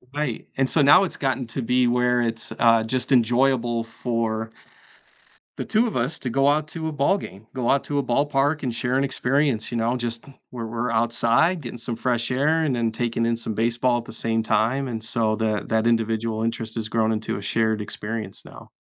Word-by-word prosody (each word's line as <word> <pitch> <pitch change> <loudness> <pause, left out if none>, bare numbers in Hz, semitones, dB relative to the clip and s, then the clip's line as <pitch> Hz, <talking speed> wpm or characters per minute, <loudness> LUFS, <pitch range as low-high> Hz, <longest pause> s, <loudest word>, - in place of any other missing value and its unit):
Right, 150 -6 -3
and 135 -1 +2
so 155 - +6
now 145 +7 +7
it's 185 - -3
gotten 135 -2 -1
to 125 +4 -4
be 125 +1 +2
where 125 0 +2
it's, 115 -1 -1
uh, 115 -1 +5
just 125 +4 -2
enjoyable 120 -1 +2
for 115 -1 -3 1.1
the - - -4
2 220 +3 +2
of - - -5
us 125 +7 -1
to 125 - -4
go 135 +2 +2
out 150 +1 +2
to 160 0 -4
a 155 - -4
ballgame, 140 - -1
go 125 -2 -2
out 140 - +3
to 145 -1 -1
a 140 - 0
ballpark 140 +3 +1
and 125 -3 -2
share 125 +2 -1
an 135 - +2
experience, 135 -3 0
you 120 - -2
know, 115 +2 0
just 120 -1 -4 0.2
where 120 -2 -6
we're 115 +2 -3
outside 120 +9 +2
getting 120 -2 -7
some 115 0 -3
fresh 120 +1 -1
air 155 +5 +2
and 140 -5 0
then 115 -1 0
taking 115 0 -1
in 115 - +1
some 115 -1 -2
baseball 120 +3 +1
at 115 - -9
the - - -9
same 115 0 0
time, 115 +5 +1
and 115 -3 -5
so 110 -1 +1
that 110 -1 -2
that 110 0 +1
individual 115 -1 0
interest 115 -1 -3
has 110 -2 -3
grown 110 0 +1
into 110 -2 -2
a - - -6
shared 110 +1 0
experience 105 -1 -5
now. - - -13
120 Hz, 210 wpm, -23 LUFS, 115-135 Hz, 1.1 s, now